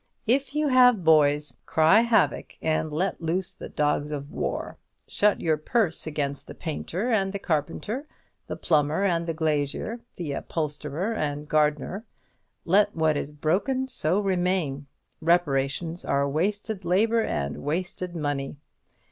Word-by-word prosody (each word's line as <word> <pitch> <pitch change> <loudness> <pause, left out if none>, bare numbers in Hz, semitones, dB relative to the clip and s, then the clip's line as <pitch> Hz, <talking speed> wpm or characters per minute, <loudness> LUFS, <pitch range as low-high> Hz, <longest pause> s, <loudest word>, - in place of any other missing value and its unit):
If 270 +4 +1
you 300 -1 +2
have 250 -6 +5
boys, 150 -4 +3
"cry 160 +7 +5
havoc, 235 -1 +1
and 155 -1 0
let 180 +6 -1
loose 175 +3 -1
the - - -9
dogs 150 0 0
of 145 -1 -5
war;" - - -3 0.3
shut 210 0 +2
your 160 -2 +1
purse 165 +1 0
against 145 -2 -3
the - - -9
painter 180 +7 -3
and 195 -4 +2
the 200 - -3
carpenter, 195 - -2 0.4
the - - -4
plumber 155 +3 +1
and 170 -3 +1
glazier, 155 - -1 0.2
the 165 -5 -4
upholsterer 150 +6 -3
and 150 -6 -3
gardener; 150 +7 +1 0.6
"let 205 +4 +3
what 160 -2 +2
is 145 - -2
broken, 185 - 0
so 195 -8 +1
remain," 180 -7 0 0.3
reparations 160 0 +1
are 140 0 +1
wasted 200 +7 -2
labour 220 +6 +3
and 70 - -2
wasted 180 +3 -3
money. 145 -3 -3
165 Hz, 135 wpm, -26 LUFS, 150-200 Hz, 0.6 s, have